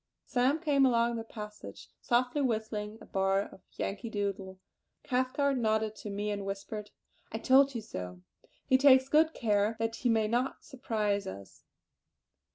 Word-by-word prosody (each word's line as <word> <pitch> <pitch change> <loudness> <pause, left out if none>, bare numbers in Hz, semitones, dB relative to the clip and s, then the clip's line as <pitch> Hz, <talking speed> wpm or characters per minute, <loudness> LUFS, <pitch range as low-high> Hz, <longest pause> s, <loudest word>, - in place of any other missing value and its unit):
Sam 265 +4 +2
came 290 -4 +2
along 235 -2 +3
the 225 - -4
passage 210 -1 -9
softly 250 +4 +1
whistling 220 -3 -2
a - - -11
bar 195 0 +1
of 190 - -13
"Yankee 200 +3 -4
Doodle." 195 -3 -3 0.4
Cathcart 260 +1 0
nodded 220 -1 0
to 210 - -7
me 205 +1 -2
and 200 -1 -3
whispered: 200 +2 -5 0.4
"I - - -3
told 270 0 +4
you 230 - -2
so! 90 - -7 0.4
He 260 - +4
takes 260 -1 +6
good 315 +3 +3
care 210 -1 +1
that 225 0 -2
he 245 - 0
may 220 -2 +3
not 245 +4 -1
surprise 215 -6 -2
us." 95 0 -10
225 Hz, 155 wpm, -31 LUFS, 205-260 Hz, 0.4 s, takes